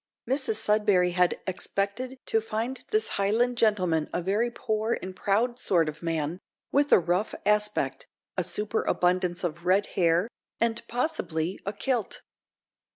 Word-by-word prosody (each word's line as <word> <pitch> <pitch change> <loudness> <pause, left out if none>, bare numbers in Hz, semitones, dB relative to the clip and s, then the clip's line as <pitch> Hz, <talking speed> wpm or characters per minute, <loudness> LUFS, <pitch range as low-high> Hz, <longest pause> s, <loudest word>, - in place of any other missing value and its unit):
Mrs 265 -3 +1
Sudberry 210 -4 +3
had 180 0 +2
expected 200 +7 -2
to 225 - +1
find 225 +4 -4
this 430 0 +3
Highland 235 +5 +2
gentleman 180 -8 +2
a 175 - -2
very 210 +6 +1
poor 220 -1 -1
and 185 0 -7
proud 230 +6 0
sort 170 -4 +2
of 150 0 -6
man, 165 0 -2 0.3
with 285 +1 +2
a - - +9
rough 175 +4 0
aspect, 210 0 +1 0.3
a - - +1
superabundance 180 -4 0
of 170 -1 -3
red 190 +3 +3
hair, 170 +2 +2 0.3
and, 230 0 +1
possibly, 185 - -2
a 200 - -1
kilt. 240 0 -2
200 Hz, 140 wpm, -27 LUFS, 180-230 Hz, 0.3 s, a